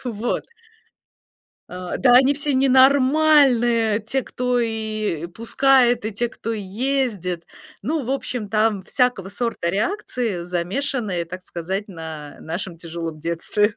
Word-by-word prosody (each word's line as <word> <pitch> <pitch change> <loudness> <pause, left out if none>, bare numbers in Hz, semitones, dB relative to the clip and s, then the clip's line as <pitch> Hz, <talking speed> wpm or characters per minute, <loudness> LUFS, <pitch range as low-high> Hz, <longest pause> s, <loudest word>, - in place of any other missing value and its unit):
Вот. 235 -1 -2 1.3
"А, 180 0 -5
да 250 -2 +4
они 270 +3 +6
все 290 0 -1
ненормальные, 260 -4 +4
те, 245 +5 -2
кто 250 0 -1
и 215 -7 -2
пускает, 245 +4 +3
и 215 - -2
те, 240 +4 -1
кто 230 0 -5
ездит." 210 -4 -2 0.4
Ну, 295 +6 -2
в 250 - -4
общем, 250 -5 -3
там 215 -2 +2
всякого 250 -7 0
сорта 205 -6 -2
реакции, 220 - -2
замешанные, 180 +2 -2
так 180 +2 -8
сказать, 190 +4 -4
на 160 -5 -8
нашем 170 +2 -5
тяжелом 165 -1 -6
детстве. 170 +6 0
220 Hz, 120 wpm, -22 LUFS, 180-255 Hz, 1.3 s, они